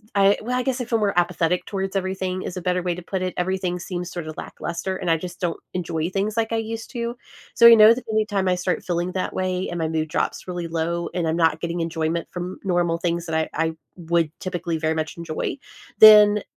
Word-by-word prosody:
I 200 Hz, 0 st, +5 dB
well, 245 Hz, +3 st, -2 dB
I -, -, +1 dB
guess 265 Hz, -1 st, -1 dB
I -, -, -3 dB
feel 230 Hz, -1 st, 0 dB
more 205 Hz, -3 st, 0 dB
apathetic 175 Hz, 0 st, +1 dB
towards 195 Hz, -1 st, -4 dB
everything 190 Hz, -1 st, -2 dB
is 180 Hz, -, -6 dB
a -, -, -4 dB
better 180 Hz, +1 st, 0 dB
way 175 Hz, -1 st, 0 dB
to 180 Hz, -, -7 dB
put 185 Hz, +1 st, -3 dB
it. 185 Hz, -, -2 dB
Everything 180 Hz, 0 st, -1 dB
seems 175 Hz, 0 st, -5 dB
sort 175 Hz, -3 st, -6 dB
of 155 Hz, -, -7 dB
lackluster, 185 Hz, +3 st, -4 dB
and 180 Hz, -2 st, -3 dB
I 165 Hz, -, +4 dB
just 175 Hz, +1 st, -8 dB
don't 175 Hz, -2 st, -2 dB
enjoy 165 Hz, -2 st, -2 dB
things 205 Hz, +3 st, -1 dB
like 225 Hz, 0 st, 0 dB
I -, -, +1 dB
used 225 Hz, 0 st, -5 dB
to. 235 Hz, -1 st, -3 dB, 0.4 s
So, 235 Hz, -, +6 dB
you 235 Hz, 0 st, +11 dB
know 215 Hz, +1 st, +8 dB
that 250 Hz, 0 st, -8 dB
anytime 210 Hz, -3 st, 0 dB
I 185 Hz, -, +3 dB
start 180 Hz, 0 st, -2 dB
feeling 175 Hz, +1 st, -2 dB
that 185 Hz, -, -2 dB
way 185 Hz, 0 st, -1 dB
and 175 Hz, -, -4 dB
my 160 Hz, -, 0 dB
mood 160 Hz, -1 st, -2 dB
drops -, -, -2 dB
really 175 Hz, -2 st, -4 dB
low 170 Hz, +1 st, -2 dB
and 175 Hz, -2 st, 0 dB
I'm 160 Hz, -, 0 dB
not 165 Hz, -2 st, +2 dB
getting 170 Hz, +1 st, -3 dB
enjoyment 165 Hz, 0 st, -2 dB
from 180 Hz, +1 st, -6 dB
normal 175 Hz, -3 st, +1 dB
things 170 Hz, 0 st, -1 dB
that 160 Hz, -2 st, -3 dB
I 160 Hz, 0 st, 0 dB, 0.2 s
I 160 Hz, -, -3 dB, 0.2 s
would 170 Hz, -2 st, 0 dB
typically 175 Hz, -3 st, -3 dB
very 160 Hz, 0 st, 0 dB
much 155 Hz, 0 st, -4 dB
enjoy, 170 Hz, -, -4 dB, 0.4 s
then 210 Hz, -1 st, +9 dB
180 Hz, 235 wpm, -23 LUFS, 170-195 Hz, 0.4 s, you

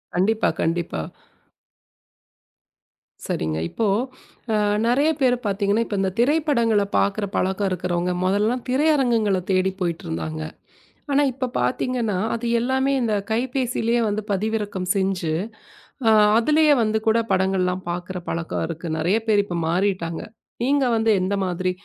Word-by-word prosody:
கண்டிப்பா, 215 Hz, +5 st, +2 dB
கண்டிப்பா. 165 Hz, -, -1 dB, 2.3 s
சரிங்க. 80 Hz, 0 st, -2 dB
இப்போ 225 Hz, -2 st, -1 dB, 0.7 s
அ -, -, +3 dB, 0.3 s
நறைய 280 Hz, +6 st, +3 dB
பேர் 250 Hz, -2 st, +4 dB
பார்த்தீங்கன்னா 200 Hz, +2 st, +1 dB
இப்ப 205 Hz, -, -3 dB
இந்த 190 Hz, -, 0 dB
திரைப்படங்களப் 235 Hz, -7 st, +2 dB
பார்க்கற 200 Hz, +1 st, 0 dB
பழக்கம் 190 Hz, +1 st, 0 dB
இருக்குறவங்க 180 Hz, 0 st, -1 dB
முதல்ல 210 Hz, +6 st, +1 dB
திரையரங்குகளத் 245 Hz, -, +2 dB
தேடி 185 Hz, 0 st, +2 dB
போயிட்டு 170 Hz, -2 st, -2 dB
இருந்தாங்க. 80 Hz, -1 st, -4 dB, 0.7 s
ஆனா 285 Hz, -, +4 dB
இப்ப 255 Hz, 0 st, -3 dB
பாத்தீங்கன்னா 225 Hz, -, -1 dB, 0.2 s
அது 230 Hz, +1 st, -4 dB
எல்லாமே 265 Hz, +3 st, +1 dB
இந்தக் 210 Hz, -4 st, -1 dB
கைப்பேசியிலயே 240 Hz, -1 st, 0 dB
வந்து 210 Hz, +1 st, -2 dB
பதிவிறக்கம் 205 Hz, -2 st, -2 dB
செஞ்சு 190 Hz, -4 st, 0 dB, 0.8 s
அ -, -, +6 dB, 0.3 s
அதுலயே 300 Hz, +5 st, +4 dB
வந்து 220 Hz, 0 st, +1 dB
கூடப் 225 Hz, 0 st, +2 dB
படங்கள்லாம் 185 Hz, -1 st, +1 dB
பார்க்குற 180 Hz, +2 st, -4 dB
பழக்கம் 165 Hz, -1 st, -3 dB
இருக்கு, 165 Hz, +1 st, -6 dB
நறைய 175 Hz, +7 st, +2 dB
பேர் 205 Hz, -2 st, +4 dB
இப்ப 175 Hz, -3 st, -4 dB
மாறிட்டாங்க. 175 Hz, -2 st, -1 dB, 0.4 s
நீங்க 275 Hz, +1 st, +2 dB
வந்து 225 Hz, 0 st, +2 dB
எந்த 190 Hz, +2 st, 0 dB
மாதிரி 185 Hz, 0 st, -1 dB
205 Hz, 125 wpm, -22 LUFS, 185-235 Hz, 2.3 s, அ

